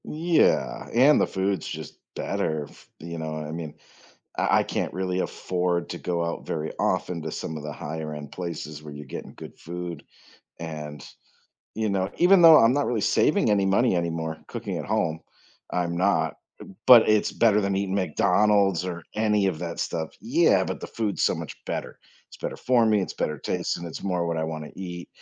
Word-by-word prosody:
Yeah, 165 +2 +1
and 135 +5 +6
the - - +2
food's 95 -2 -1
just - - -7 0.2
better. 80 -2 -2
F - - -19
you 85 +1 -7
know, 80 -1 -4
I 75 -1 -5
mean, 80 -2 -6 0.6
I - - +3
I - - +2
can't - - -3
really 95 0 -1
afford 90 -1 -1
to - - -4
go 85 -1 -2
out 85 - -4
very 80 -1 -3
often 85 -2 0
to - - -4
some 80 - -5
of 75 - -8
the 75 - -5
higher 80 0 -5
end 75 -1 -8
places 75 -4 -6
where 75 -1 -9
you're 75 0 -9
getting 65 - -8
good - - -11
food, 85 -2 -6 0.6
and, 75 -4 -7 0.7
you 110 0 -1
know, 95 -1 0
even 180 +1 +6
though 165 -2 +10
I'm 115 +2 +5
not 145 0 +1
really 120 -3 0
saving 105 - +3
any 100 -1 +3
money 100 +2 +3
anymore 80 -2 -2
cooking - - -4
at - - -5
home, 80 -1 0 0.5
I'm 85 -1 -1
not, 85 -4 +2 0.5
but 120 -3 +9
it's 110 -1 +3
better 110 -3 +4
than 100 0 0
eating 95 -1 -1
McDonald's 100 +1 +2
or 85 -2 -4
any 105 -2 +2
of 90 -5 -1
that 85 -1 -4
stuff 80 -2 -2
yeah, - - +3
but - - -4
the - - -5
food's 110 -3 -2
so - - +3
much - - -7
better. - - -4 0.3
It's - - -13
better - - -5
for 120 -2 +3
me, 105 -2 +3
it's 95 - -4
better 75 -1 -2
taste, - - -2
and 85 - -6
it's 80 - -7
more 90 -3 -1
what 85 -1 -1
I 80 - -1
wanna 80 -1 -5
eat. 90 -2 -7
90 Hz, 195 wpm, -25 LUFS, 80-100 Hz, 0.7 s, though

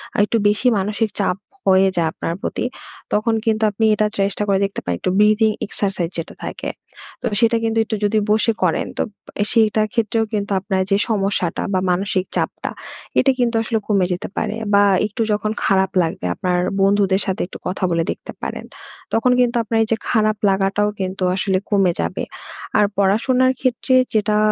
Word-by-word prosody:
আর - - 0
একটু 230 - 0
বেশি 210 +5 +1
মানসিক 210 +3 -1
চাপ 180 - +1 0.3
হয়ে 190 0 +5
যায় 165 - +2
আপনার 165 - -3
প্রতি, - - -2 0.5
তখন 220 +2 +2
কিন্তু 220 -1 +1
আপনি 220 +2 0
এটা 215 - +1
চেষ্টা 200 +1 0
করে 195 -1 +2
দেখতে 200 - -4
পারেন। 90 - -1
একটু 185 - -1
breathing 215 +1 +4
exercise 190 -4 -1
যেটা 165 - -5
থাকে, - - -5 0.5
তো - - -4
সেটা 230 0 +3
কিন্তু 225 0 0
একটু 220 - -2
যদি 215 +1 +2
বসে 220 +2 +3
করেন, 170 -3 +1
তো - - +1 0.4
এ - - +4
সেইটার 215 -2 +3
ক্ষেত্রেও 225 -1 +1
কিন্তু 205 -1 -2
আপনার 190 -1 -1
যে 195 - +5
সমস্যাটা 195 -5 0
বা 185 - +2
মানসিক 185 0 0
চাপটা - - -2 0.5
এটা 270 - +4
কিন্তু 240 -1 +1
আসলে 225 0 -1
কমে 200 -4 +2
যেতে 180 - -5
পারে। 215 0 -1 0.2
বা 200 - +6 0.2
একটু 215 +2 -5
যখন 215 +1 -1
খারাপ 190 -1 +2
লাগবে, 165 - -4
আপনার 180 -1 0 0.2
বন্ধুদের 195 0 +3
সাথে 190 -3 -2
একটু - - -9
কথা 185 +1 -4
বলে 165 0 +1
দেখতে - - -8
পারেন। - - -5 0.5
তখন 240 +3 +3
কিন্তু 245 -1 +2
আপনার 225 +1 -1
এই 220 - -3
যে 225 - +3
খারাপ 215 -2 +2
লাগাটাও 195 +2 +1
কিন্তু 185 0 -3
আসলে 190 0 +1
কমে 195 -4 +3
যাবে। - - -3 0.5
আর 210 - +5
পড়াশোনার 250 +6 +3
ক্ষেত্রে 255 0 +1 0.2
যেটা, 210 -1 +2
205 Hz, 180 wpm, -20 LUFS, 190-220 Hz, 0.5 s, বা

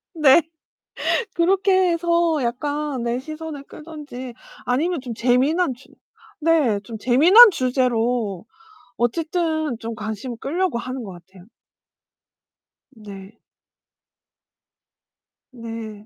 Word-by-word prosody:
네. 305 +1 +6 0.9
그렇게 375 +1 +3
해서 335 -2 +1
약간 285 +2 -3
네 240 +1 -1
시선을 310 0 -8
끌든지 295 -6 -9 0.3
아니면 305 +5 0
좀 245 -3 -6
재미난 260 +7 +1
주 260 - -20 0.5
네 295 -11 +2
좀 225 +2 -8
재미난 340 - +7
주제로 245 - -1 0.5
어쨌든 315 +1 -1
좀 230 0 -5
관심을 220 +3 -6
끌려고 335 -2 -1
하는 255 +1 -6
것 200 - -8
같아요. 180 +1 -16 1.5
네. 205 0 -12 2.1
네. 225 -3 -8
260 Hz, 185 characters per minute, -21 LUFS, 230-320 Hz, 2.1 s, 재미난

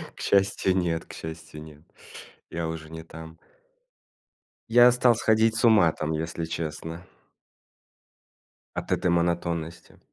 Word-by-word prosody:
К - - -17
счастью, 95 -1 +2
нет 85 -2 -1
к - - -12
счастью, 80 -1 -9
нет. 75 -1 -14 0.7
Я 85 -1 -3
уже 80 -1 -6
не 80 0 -8
там. 80 0 -11 1.3
Я 120 +1 +7
стал 125 -1 +3
сходить 110 0 +2
с 115 - -1
ума 105 -8 +5
там, 80 0 -3
если 80 +1 -3
честно. 80 +1 -5 1.7
От - - -5
этой 90 - +1
монотонности. 85 -1 -2
85 Hz, 125 wpm, -26 LUFS, 80-95 Hz, 1.7 s, Я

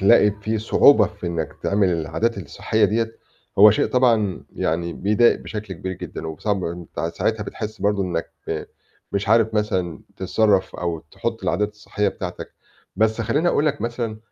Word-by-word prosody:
تلاقي 100 +2 +6
في 110 +1 -1
صعوبة 110 0 +5
في 100 -4 -8
إنّك 80 -2 -2
تعمل 100 -2 +2
العادات 100 +7 -1
الصحية 110 +4 0
دِيّة، 115 +2 +1 0.5
هو 105 +1 +10
شيء 105 - +2
طبعًا 115 -7 +2
يعني 85 +1 -1
بيضايق 105 +4 +3
بشكل 105 -3 -6
كبير 95 +3 -5
جدًا، 85 - -7
وب 80 -2 -7
صعب 100 -3 0
أنت 85 -2 -6
ساعتها 110 -1 0
بتحس 110 +1 -6
برضه 100 -1 +1
إنّك 85 -3 -3 0.8
مش 100 0 -1
عارف 110 0 +4
مثلًا 95 -6 -1 0.2
تتصرّف، 95 0 +1
أو 85 -2 -2
تحط - - -4
العادات 105 +5 0
الصحية 105 -1 -2
بتاعتك. - - -6 0.4
بس 110 +1 +2
خلّيني 150 +9 +1
أقول 150 -2 +2
لك 145 -1 0
مثلًا، 115 -2 -3
105 Hz, 160 wpm, -22 LUFS, 95-110 Hz, 0.8 s, هو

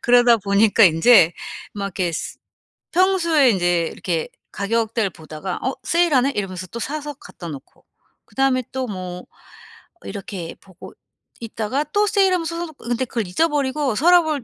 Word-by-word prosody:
그러다 240 -1 +5
보니까 205 +1 +4
인제 170 +1 +6 0.4
막 200 -1 -4
이렇게 180 -3 -2
스 - - -5 0.6
평소에 335 -7 +3
인제 175 -3 +1
이렇게 170 -3 -3 0.2
가격대를 220 +1 -1
보다가 160 +3 -7
'어 260 +1 -1
세일하네.' 295 -6 +2
이러면서 185 -3 -4
또 235 - -7
사서 295 +3 -4
갖다 175 -8 -11
놓고. 140 -4 -11 0.4
그다음에 270 -1 +1
또 260 -1 -2
뭐 185 -4 -6 0.8
이렇게 195 -4 -7
보고 185 -2 -14 0.5
있다가 230 +4 -2
또 415 +5 +1
세일하면 375 -4 +2
사다 335 +1 -3
놓고 315 -4 -14
근데 245 +2 0
그걸 230 -4 -3
잊어버리고 285 - 0
서랍을 315 0 +3
230 Hz, 330 characters per minute, -21 LUFS, 185-295 Hz, 0.8 s, 인제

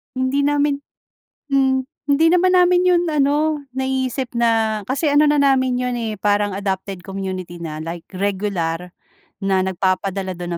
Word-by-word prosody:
Hindi 260 +2 +1
namin 290 -1 +1 0.7
mm. 265 -1 +2 0.3
Hindi 285 +3 +3
naman 365 +1 +4
namin 360 0 +4
'yon 350 -1 +4
ano 300 +1 +1 0.2
naisip 265 -1 -2
na 225 -2 +1
kasi 285 +3 0
ano 295 +1 +5
na 295 - +3
namin 265 -3 +3
'yon, 250 0 -1
eh, 220 -2 -3
parang 205 0 0
adopted 190 -2 -4
community 185 -2 -5
na 155 -2 -6
like 165 +1 -7
regular 185 -3 -2 0.4
na 195 -1 +1
nagpapadala 190 0 -1
dun 175 0 -6
230 Hz, 140 wpm, -20 LUFS, 190-280 Hz, 0.7 s, ano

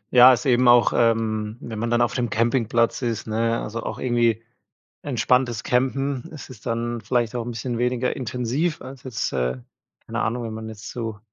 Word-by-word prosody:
Ja, 125 +1 +10
ist 125 - +1
eben 125 -1 +4
auch, 120 0 +6
ähm, 110 -1 +1
wenn 110 -2 -6
man 115 - -1
dann 120 0 +2
auf 115 -4 0
dem 120 -2 -1
Campingplatz 115 0 +1
ist, 120 -3 -2
ne, 115 +1 0
also, 115 +2 -4
auch - - -5
irgendwie 120 -3 +1 0.6
entspanntes 125 -3 +1
Campen, 135 +1 0
es 145 - -10
ist 120 -1 -13
dann 115 0 -2
vielleicht 120 0 0
auch 120 -1 -3
'n - - -3
bisschen 120 +1 -4
weniger 125 +1 0
intensiv 130 +5 -2
als 130 0 -10
jetzt, 120 -3 -3
äh, 65 -1 0 0.5
keine - - -4
Ahnung, 120 +2 -1
wenn 115 - -5
man 110 0 -6
jetzt 110 -1 -9
zu, 115 -3 -5
120 Hz, 190 wpm, -23 LUFS, 115-125 Hz, 0.6 s, Ja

